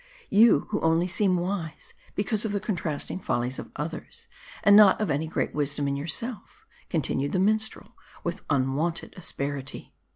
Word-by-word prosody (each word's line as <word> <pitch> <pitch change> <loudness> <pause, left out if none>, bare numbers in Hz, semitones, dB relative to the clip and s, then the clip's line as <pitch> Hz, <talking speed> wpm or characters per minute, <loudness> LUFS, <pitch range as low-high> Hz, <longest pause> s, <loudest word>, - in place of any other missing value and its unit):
" - - -28
You, 230 - +7
who 210 - 0
only 165 +2 +3
seem 185 0 +2
wise, 175 -3 -4 0.2
because 210 +1 0
of 215 -2 -2
the 205 - +1
contrasting 180 -6 -3
follies 125 -6 -1
o - - -7
others, 160 +2 -6 0.4
and 200 0 +7
not 205 -2 +8
of 210 -7 0
any 150 +3 0
great 155 - -2
wisdom 145 -1 0
in 140 - 0
yourself," 180 - -5 0.2
continued 145 -3 -1
the 185 - +2
minstrel, 215 +3 0 0.3
with - - -3
unwonted 145 +4 0
asperity. 140 -6 -5
170 Hz, 160 wpm, -27 LUFS, 145-205 Hz, 0.4 s, not